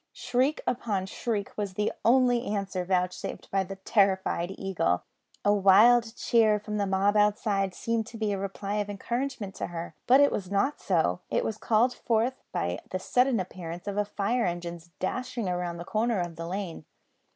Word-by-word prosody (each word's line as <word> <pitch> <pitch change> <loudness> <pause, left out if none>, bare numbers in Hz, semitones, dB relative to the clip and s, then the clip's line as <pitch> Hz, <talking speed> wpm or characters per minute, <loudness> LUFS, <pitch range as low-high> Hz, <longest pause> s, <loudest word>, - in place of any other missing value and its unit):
Shriek 255 +4 0
upon 220 -6 -1
shriek 205 0 -3
was 200 -3 -3
the 210 +1 0
only 245 0 +4
answer 195 -3 -2
vouchsafed 180 0 -2
by 195 -1 +2
the 195 +1 -7
terrified 190 -3 +1
Eagle. 185 - 0 0.4
A 205 - +5
wild 225 +4 +5
cheer 220 -4 +3
from 210 0 -4
the 200 -1 0
mob 195 +2 +2
outside 205 -2 +2
seemed 230 -1 -1
to 230 - -9
be 215 -2 0
a 200 - -1
reply 200 +1 -3
of 205 -1 -1
encouragement 235 0 -3
to - - -3
her; 170 -1 -6
but 260 +3 +7
it 285 0 +5
was 185 -3 -3
not 205 +9 0
so; 160 - +1
it - - 0
was 215 -1 -3
called 235 +3 +3
forth 240 +2 0
by 85 +1 -2
the 185 - -2
sudden 250 +5 +2
appearance 175 0 -6
of 200 - -2
a 210 - +3
fire 210 +3 0
engine 175 -1 -4 0.2
dashing 240 +3 -3
round 175 -2 -2
the 170 - -6
corner 220 +1 0
of 175 -2 -3
the 165 0 -6
lane. 180 -4 -5
200 Hz, 180 wpm, -28 LUFS, 185-230 Hz, 0.4 s, but